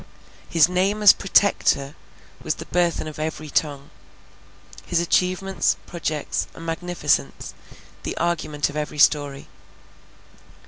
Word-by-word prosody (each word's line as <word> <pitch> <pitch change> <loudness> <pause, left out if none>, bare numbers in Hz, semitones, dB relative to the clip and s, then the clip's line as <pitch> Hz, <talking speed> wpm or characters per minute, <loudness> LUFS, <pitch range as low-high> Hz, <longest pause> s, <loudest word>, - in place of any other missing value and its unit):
His 165 -2 +5
name 190 +4 0
as 205 - +10
Protector 180 -8 +2 0.5
was - - -2
the - - -9
burthen 170 -2 0
of 155 0 -8
every 155 -1 -4
tongue; 145 -2 -1 0.9
his 175 - 0
achievements, 180 - +1
projects, 155 -3 -3
and 165 - -10
magnificence, 165 -4 -1 0.5
the - - -5
argument 155 -4 -1
of - - -13
every 150 0 -4
story. 145 -2 +2
165 Hz, 110 wpm, -23 LUFS, 150-180 Hz, 0.9 s, as